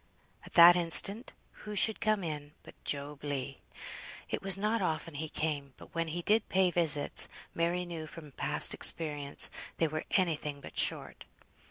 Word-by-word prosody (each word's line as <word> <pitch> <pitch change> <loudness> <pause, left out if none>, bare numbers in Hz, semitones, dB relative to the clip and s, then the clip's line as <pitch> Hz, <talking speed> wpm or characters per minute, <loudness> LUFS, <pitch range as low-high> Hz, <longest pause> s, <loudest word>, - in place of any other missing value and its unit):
At - - -15
that 175 0 +8
instant, 185 +7 +3 0.3
who 210 0 -8
should 215 +2 +4
come 215 -3 0
in 150 -2 -6
but - - -14
Job 145 0 -3
Legh. 135 -2 -5 0.7
It - - -3
was 195 -1 +3
not 215 +2 -1
often 165 -2 -3
he 155 +2 -5
came, 145 -5 -4
but - - -16
when 165 -1 -2
he 170 +2 -5
did 215 +3 +1
pay 185 -1 +2
visits, 155 -4 +3 0.3
Mary 175 +2 -1
knew 165 -2 -7
from 150 -2 -12
past - - -1
experience 145 -3 +2 0.3
they 165 - +1
were 155 0 -5
any 180 -5 +1
thing 145 -1 -7
but - - -13
short. - - -1
165 Hz, 170 wpm, -30 LUFS, 150-180 Hz, 0.7 s, that